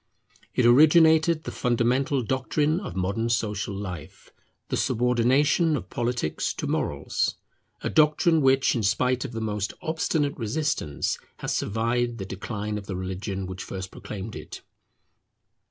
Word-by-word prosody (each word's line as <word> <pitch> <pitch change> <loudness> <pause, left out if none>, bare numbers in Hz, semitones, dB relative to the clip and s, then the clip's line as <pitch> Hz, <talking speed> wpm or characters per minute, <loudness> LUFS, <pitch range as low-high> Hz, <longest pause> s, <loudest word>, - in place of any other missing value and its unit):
It 125 - +3
originated 160 +4 +6
the - - -5
fundamental 125 +3 +1
doctrine 145 - 0
of 195 - -7
modern 100 +5 -1
social 105 -3 -1
life, 90 -6 -8 0.4
the - - 0
subordination 130 +6 +2
of 95 -7 -9
Politics 120 -9 -1
to - - -4
Morals; - - -1 0.5
a - - -2
doctrine 155 +2 +4
which 135 0 +4
in 120 - 0
spite 125 +5 +1
of - - -5
the 115 -2 -4
most 105 -2 -2
obstinate 155 -2 -1
resistance 115 - -1 0.2
has - - -2
survived 115 +2 0
the 95 - -5
decline 105 +2 -4
of 100 - -12
the 95 - -4
religion 95 +1 -4
which 95 0 -6
first 95 0 -6
proclaimed 105 +1 -7
it. - - -8
120 Hz, 140 wpm, -26 LUFS, 105-140 Hz, 0.5 s, originated